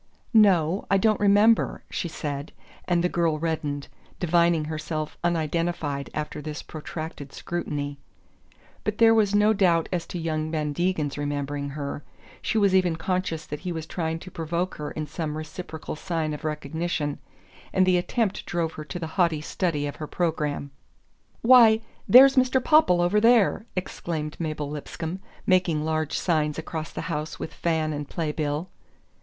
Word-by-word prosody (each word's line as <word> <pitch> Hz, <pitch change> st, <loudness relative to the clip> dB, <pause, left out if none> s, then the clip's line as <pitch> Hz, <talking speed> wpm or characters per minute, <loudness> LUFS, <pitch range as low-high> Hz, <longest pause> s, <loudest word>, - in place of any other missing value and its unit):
"No 190 Hz, -5 st, +4 dB
I 195 Hz, -, +4 dB
don't 215 Hz, +1 st, +2 dB
remember," 205 Hz, +2 st, +4 dB
she -, -, -2 dB
said; 145 Hz, -2 st, -5 dB, 0.3 s
and 175 Hz, -1 st, +1 dB
the -, -, +4 dB
girl 170 Hz, -3 st, +1 dB
reddened, 150 Hz, -3 st, -2 dB, 0.3 s
divining 170 Hz, -2 st, +3 dB
herself 155 Hz, 0 st, -4 dB
unidentified 165 Hz, -3 st, -1 dB
after 150 Hz, 0 st, -4 dB
this 150 Hz, 0 st, -6 dB
protracted 155 Hz, -2 st, -7 dB
scrutiny. 145 Hz, -4 st, -4 dB, 0.8 s
But 215 Hz, 0 st, -2 dB
there 225 Hz, -1 st, +6 dB
was 210 Hz, -2 st, +3 dB
no 210 Hz, +1 st, +5 dB
doubt 175 Hz, -5 st, +3 dB
as 175 Hz, -2 st, -2 dB
to -, -, -5 dB
young 155 Hz, -2 st, -2 dB
Van 150 Hz, -2 st, -1 dB
Degen's 155 Hz, -4 st, -1 dB
remembering 145 Hz, 0 st, -2 dB
her. 145 Hz, 0 st, -4 dB, 0.4 s
She 225 Hz, -, -1 dB
was 200 Hz, -3 st, +4 dB
even 180 Hz, -3 st, +3 dB
conscious 165 Hz, -1 st, -2 dB
that 150 Hz, -, -6 dB
he 180 Hz, -, -4 dB
was 160 Hz, -2 st, -4 dB
trying 160 Hz, -1 st, -2 dB
to 185 Hz, -, -10 dB
provoke 170 Hz, +2 st, -3 dB
in 150 Hz, +1 st, -4 dB
her -, -, -16 dB
some 155 Hz, -2 st, -4 dB
reciprocal 155 Hz, 0 st, -6 dB
sign 160 Hz, -2 st, -2 dB
of 150 Hz, -, -7 dB
recognition; 150 Hz, 0 st, -2 dB, 0.5 s
and 185 Hz, -1 st, +3 dB
the 185 Hz, -1 st, +4 dB
attempt 205 Hz, +2 st, -1 dB
drove 170 Hz, -2 st, -1 dB
her 155 Hz, -, -7 dB
to 150 Hz, +2 st, -6 dB
the 170 Hz, -, -4 dB, 0.2 s
haughty 170 Hz, -3 st, +2 dB
study 150 Hz, -1 st, -1 dB
of 145 Hz, -, -5 dB
her 155 Hz, -, -5 dB
programme. 150 Hz, -5 st, -2 dB, 0.7 s
"Why, 230 Hz, -3 st, +7 dB, 0.3 s
there's 270 Hz, +2 st, +9 dB
Mr. 255 Hz, 0 st, +4 dB
Popple 280 Hz, -, +5 dB
over 185 Hz, +4 st, +3 dB
there!" 230 Hz, -1 st, +4 dB
exclaimed 160 Hz, -4 st, -4 dB
Mabel 155 Hz, -3 st, -3 dB
Lipscomb, 160 Hz, +4 st, -5 dB, 0.3 s
making 175 Hz, -5 st, +2 dB
large 155 Hz, -1 st, -1 dB
signs 155 Hz, -4 st, 0 dB
across 160 Hz, -1 st, -5 dB
the -, -, -5 dB
house 155 Hz, -2 st, -4 dB
with -, -, -6 dB
fan 160 Hz, -2 st, 0 dB
and 145 Hz, -1 st, -5 dB
play 160 Hz, -3 st, -2 dB
bill. 150 Hz, +2 st, -2 dB
165 Hz, 160 wpm, -25 LUFS, 150-185 Hz, 0.8 s, there's